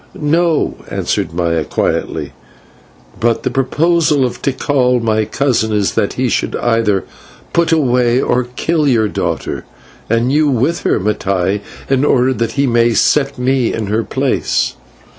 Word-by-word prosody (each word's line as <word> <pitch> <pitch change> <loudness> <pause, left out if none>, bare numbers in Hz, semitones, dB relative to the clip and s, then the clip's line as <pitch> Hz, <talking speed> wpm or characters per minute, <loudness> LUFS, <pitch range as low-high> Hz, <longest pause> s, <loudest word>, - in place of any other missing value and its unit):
"No," 160 +2 +1
answered - - -2
Maya 85 -1 0
quietly, - - -2 0.9
"but 115 -1 +1
the 130 - -1
proposal 150 +2 +2
of 125 - -5
Tikal, 130 -2 +1
my 110 -2 0
cousin, 120 -3 0
is, 105 -2 0
that - - 0
he - - -1
should - - -1
either 115 -5 +1 0.5
put 170 0 +2
away 125 -5 +2
or 125 -1 +1
kill 160 0 0
your 115 -5 +3
daughter - - -3 0.5
and 115 +3 +1
you 150 +1 +3
with 135 +7 +1
her, - - +1
Mattai 100 -1 -1 0.3
in 135 0 +1
order 130 -2 +3
that 115 -2 -2
he 140 0 +1
may 120 -2 +2
set 140 +2 +2
me 125 -1 +1
in 110 - -3
her 115 +1 +1
place." - - 0
125 Hz, 145 wpm, -15 LUFS, 110-140 Hz, 0.9 s, your